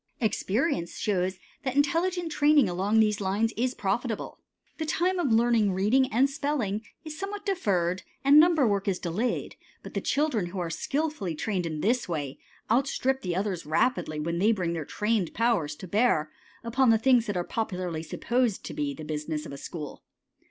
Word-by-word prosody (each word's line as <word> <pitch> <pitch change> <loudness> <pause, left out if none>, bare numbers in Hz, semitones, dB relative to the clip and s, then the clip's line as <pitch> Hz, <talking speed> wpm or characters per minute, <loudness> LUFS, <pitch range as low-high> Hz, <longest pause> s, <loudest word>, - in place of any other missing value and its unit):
Experience 215 - 0
shows 190 -2 0 0.3
that 260 -2 -2
intelligent 335 +4 +1
training 295 -4 +4
along 195 +5 +1
these 210 -1 +2
lines 205 +4 0
is 250 +3 -1
profitable. 215 +3 -2 0.4
The 315 - -1
time 360 +4 +1
of 280 -8 +1
learning 225 -3 +3
reading 230 +8 +2
and 250 +5 +4
spelling 275 -8 -2 0.2
is 310 0 -7
somewhat 400 +1 -5
deferred, 185 - 0 0.2
and 280 +2 +7
number 320 -5 +5
work 200 -1 0
is 190 -2 +1
delayed, 190 +9 -2 0.3
but - - -9
the - - -2
children 275 - 0
who 185 +3 -7
are 175 -2 -2
skilfully 280 - -2
trained 185 0 -2
in 155 -2 -4
this 235 -1 +1
way 145 -5 -3 0.3
outstrip 265 +1 +1
the 180 -2 -2
others 190 -5 -2
rapidly 155 -2 +1
when 170 +2 -2
they 210 +4 +4
bring 180 -6 -1
their 160 -3 -4
trained 210 -2 -1
powers 210 -11 +1
to 185 - -9
bear 190 -7 +2 0.3
upon 245 +2 +2
the 225 - +6
things 240 0 +3
that 205 -3 -2
are 175 - 0
popularly 180 -6 -3
supposed 235 +7 -1
to - - -6
be 140 -1 -2
the 155 - -8
business 150 0 -3
of - - -8
a - - -6
school. 150 0 -7
215 Hz, 180 wpm, -27 LUFS, 175-260 Hz, 0.4 s, and